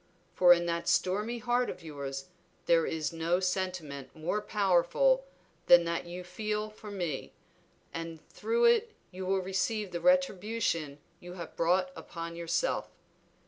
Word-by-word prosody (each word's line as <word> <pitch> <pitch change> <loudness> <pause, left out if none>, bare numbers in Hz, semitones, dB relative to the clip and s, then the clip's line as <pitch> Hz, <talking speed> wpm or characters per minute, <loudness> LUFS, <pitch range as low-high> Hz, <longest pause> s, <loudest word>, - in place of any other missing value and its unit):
For 180 -1 +6
in 175 0 +6
that 170 0 -2
stormy 210 +6 +1
heart 245 +1 +1
of 180 -1 -7
yours 140 -3 -5 0.4
there 165 -1 +4
is 155 -1 -2
no 165 +2 +1
sentiment 180 -8 -3
more 170 +7 -1
powerful 210 - +2 0.4
than 175 0 +8
that 170 0 -2
you 180 +1 -6
feel 210 +3 -3
for 215 0 -11
me, 175 -9 -4 0.6
and 165 -1 -5
through 470 +1 +1
it 470 -1 +3 0.2
you 185 0 -6
will 190 0 +2
receive 195 +2 -1
the 170 -1 -4
retribution 210 - +1 0.2
you 175 0 -9
have 170 -3 -8
brought 180 +2 +2
upon 170 0 -7
yourself. 170 - -1
180 Hz, 145 wpm, -30 LUFS, 170-210 Hz, 0.6 s, than